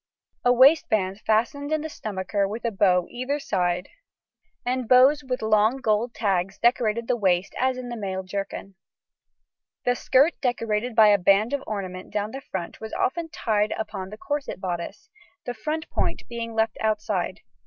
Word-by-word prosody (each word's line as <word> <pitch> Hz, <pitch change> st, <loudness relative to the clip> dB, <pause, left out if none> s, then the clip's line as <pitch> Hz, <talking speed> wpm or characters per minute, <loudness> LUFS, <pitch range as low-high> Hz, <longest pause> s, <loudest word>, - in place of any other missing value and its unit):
A 245 Hz, -, +5 dB
waistband 230 Hz, -7 st, +4 dB
fastened 240 Hz, +7 st, +1 dB
in 310 Hz, -1 st, +1 dB
the 315 Hz, -, -4 dB
stomacher 200 Hz, -6 st, -2 dB
with 220 Hz, +4 st, -6 dB
a 235 Hz, -, +1 dB
bow 185 Hz, -4 st, +3 dB
either 255 Hz, +4 st, -2 dB
side 180 Hz, -8 st, -1 dB, 0.8 s
and 250 Hz, -1 st, -1 dB
bows 265 Hz, +4 st, +6 dB
with 255 Hz, -3 st, -3 dB
long 220 Hz, +3 st, +3 dB
gold 230 Hz, -1 st, 0 dB
tags 195 Hz, -3 st, 0 dB
decorated 235 Hz, -1 st, +1 dB
the 250 Hz, -, +2 dB
waist 190 Hz, -4 st, +1 dB
as 260 Hz, 0 st, +1 dB
in 250 Hz, -1 st, -6 dB
the 240 Hz, -, -4 dB
male 190 Hz, -3 st, -4 dB
jerkin. 195 Hz, +1 st, -5 dB, 1.1 s
The 245 Hz, -, +3 dB
skirt 275 Hz, +6 st, +3 dB
decorated 235 Hz, -2 st, -1 dB
by 215 Hz, -2 st, +7 dB
a 205 Hz, -1 st, +5 dB
band 200 Hz, +6 st, +3 dB
of 280 Hz, -1 st, -1 dB
ornament 185 Hz, -3 st, -5 dB
down 210 Hz, +1 st, -2 dB
the 270 Hz, -, -7 dB
front 185 Hz, -8 st, -6 dB
was 220 Hz, 0 st, -7 dB
often 325 Hz, +5 st, -1 dB
tied 215 Hz, -8 st, 0 dB
upon 190 Hz, -3 st, -5 dB
the 215 Hz, -, -9 dB
corset 290 Hz, -, -4 dB
bodice, 185 Hz, -, -5 dB, 0.3 s
the 245 Hz, -, -3 dB
front 305 Hz, +8 st, -4 dB
point -, -, -1 dB
being 230 Hz, -1 st, -5 dB
left 220 Hz, 0 st, +1 dB
outside. 215 Hz, -1 st, -1 dB
220 Hz, 165 wpm, -25 LUFS, 200-255 Hz, 1.1 s, by